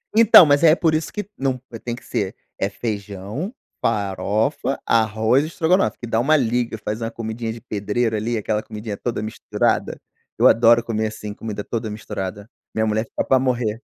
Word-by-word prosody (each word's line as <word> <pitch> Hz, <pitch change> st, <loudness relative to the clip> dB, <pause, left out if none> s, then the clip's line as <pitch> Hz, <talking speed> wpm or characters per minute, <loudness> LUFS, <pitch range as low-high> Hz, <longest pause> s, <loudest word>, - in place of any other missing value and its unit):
Então, 220 Hz, -5 st, +9 dB
mas 145 Hz, 0 st, +3 dB
é 160 Hz, -1 st, +7 dB
por 165 Hz, -2 st, +1 dB
isso 155 Hz, 0 st, -1 dB
que 210 Hz, -2 st, -5 dB
não 135 Hz, -1 st, -1 dB
eh, 115 Hz, -, -7 dB
tem 120 Hz, +1 st, -4 dB
que -, -, -14 dB
ser, -, -, -2 dB, 0.2 s
é 95 Hz, -, 0 dB
feijão, 105 Hz, -, -5 dB, 0.3 s
farofa, 110 Hz, +6 st, 0 dB
arroz 110 Hz, +3 st, +2 dB
e -, -, -3 dB
estrogonofe, 170 Hz, +4 st, +1 dB
que -, -, -7 dB
dá 115 Hz, 0 st, +1 dB
uma 155 Hz, +6 st, +4 dB
liga, 120 Hz, -2 st, 0 dB
faz 110 Hz, +1 st, -4 dB
uma 115 Hz, -, -2 dB
comidinha 115 Hz, 0 st, -4 dB
de 115 Hz, -, -8 dB
pedreiro 110 Hz, +1 st, -1 dB
ali, 115 Hz, +2 st, -1 dB
aquela 105 Hz, 0 st, -1 dB
comidinha 105 Hz, -1 st, -6 dB
toda 115 Hz, +2 st, -3 dB
misturada, 110 Hz, -, -1 dB, 0.4 s
eu -, -, +6 dB
adoro 115 Hz, 0 st, +5 dB
comer 110 Hz, -2 st, -1 dB
assim, 105 Hz, -1 st, -7 dB
comida 105 Hz, -1 st, -6 dB
toda 115 Hz, 0 st, -3 dB
misturada, 100 Hz, -1 st, -6 dB, 0.3 s
minha 110 Hz, 0 st, +1 dB
mulher 110 Hz, +1 st, 0 dB
fica -, -, -3 dB
pra 130 Hz, -, +4 dB
morrer. 120 Hz, -4 st, -1 dB
115 Hz, 185 wpm, -21 LUFS, 105-125 Hz, 0.4 s, Então